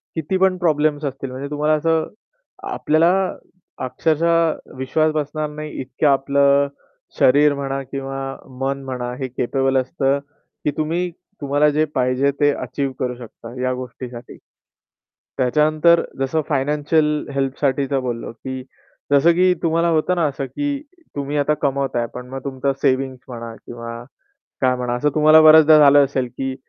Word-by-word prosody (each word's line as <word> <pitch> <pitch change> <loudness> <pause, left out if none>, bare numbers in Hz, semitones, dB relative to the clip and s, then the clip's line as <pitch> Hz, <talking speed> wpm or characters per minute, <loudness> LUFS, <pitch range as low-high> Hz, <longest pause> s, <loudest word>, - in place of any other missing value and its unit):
किती 160 +4 -1
पण 190 -1 +2
प्रॉब्लेम्स 155 -3 +1
असतील, 135 -1 -5
म्हणजे 135 +2 -6
तुम्हाला 150 +1 +1
असं 160 +1 +1 0.6
आपल्याला 165 +4 +2 0.7
अक्षरशः 165 +4 0
विश्वास 155 +4 +1
बसणार 150 0 -2
नाही 150 0 -7
इतक्या 135 +3 +1
आपलं 140 +1 +3 0.5
शरीर 145 +3 +5
म्हणा 135 -1 -3
किंवा 135 0 -5 0.2
मन 135 0 -2
म्हणा, 125 -2 -4
हे 130 0 -4
कॅपेबल 135 +2 0
असतं, 135 +1 0 0.4
की 150 - +1
तुम्ही 170 +3 -1 0.3
तुम्हाला 145 +2 +2
जे 155 +1 +1
पाहिजे 130 +2 +2
ते 145 0 +4
अचीव्ह 135 +2 -3
करू 125 -1 -2
शकता, 120 0 -11
या 130 0 0
गोष्टीसाठी. 125 -1 -8 1.0
त्याच्यानंतर 155 +6 +3 0.2
जसं 135 +4 0
फायनान्शियल 150 +2 +1
हेल्पसाठी 135 0 0
तर 135 - +2
बोललो, 120 -2 -4
की 130 +3 -7 0.5
जसं 145 +4 +5
की 180 +1 +4
तुम्हाला 165 +1 +2
होतं 160 +3 +1
ना 170 -3 +1
असं, 140 -1 -4
की 285 - -3 0.3
तुम्ही 145 +1 -3
आता 145 +1 +2
कमवताय 135 -4 0
पण 125 0 -8
मग 135 0 -7
तुमचं 135 0 -2
सेव्हिंग्ज 130 -1 +1
म्हणा 115 -2 -7
किंवा 115 0 -8 0.6
काय 130 -1 +3
म्हणा, 125 -1 -2
असं 150 +5 +1
तुम्हाला 155 +1 +7
बऱ्याचदा 155 0 +8
झालं 145 -1 +7
असेल, 130 -2 -2
की 130 +2 -5
140 Hz, 145 wpm, -20 LUFS, 130-155 Hz, 1.0 s, बऱ्याचदा